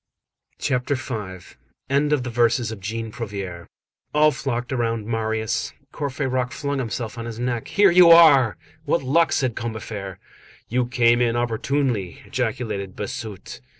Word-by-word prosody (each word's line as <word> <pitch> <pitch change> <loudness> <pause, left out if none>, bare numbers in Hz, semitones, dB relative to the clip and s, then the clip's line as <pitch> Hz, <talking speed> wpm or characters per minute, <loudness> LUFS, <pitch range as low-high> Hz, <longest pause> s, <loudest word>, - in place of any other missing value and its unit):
CHAPTER 125 +2 0
V—END 130 +5 -4
OF 145 -4 +2
THE 120 - -4
VERSES 120 0 +2
OF 110 - -7
JEAN 110 +3 -4
PROUVAIRE 100 -6 -6 0.5
All 150 0 +5
flocked 125 -3 -3
around 115 -3 -1
Marius. 110 -1 -2 0.2
Courfeyrac 130 -3 -2
flung 140 -1 -2
himself 115 -1 -4
on 115 - -5
his 115 -1 -6
neck. 120 -2 -2
"Here 200 -2 +4
you 175 -1 +7
are!" 145 -9 +7 0.3
"What 155 0 0
luck!" 160 +4 +3
said 130 -4 0
Combeferre. 110 -4 -5 0.5
"You 125 +1 0
came 120 -1 +3
in 120 -1 +2
opportunely!" 120 - -1
ejaculated 110 -6 -3
Bossuet. 105 - -6
120 Hz, 135 wpm, -23 LUFS, 110-135 Hz, 0.5 s, you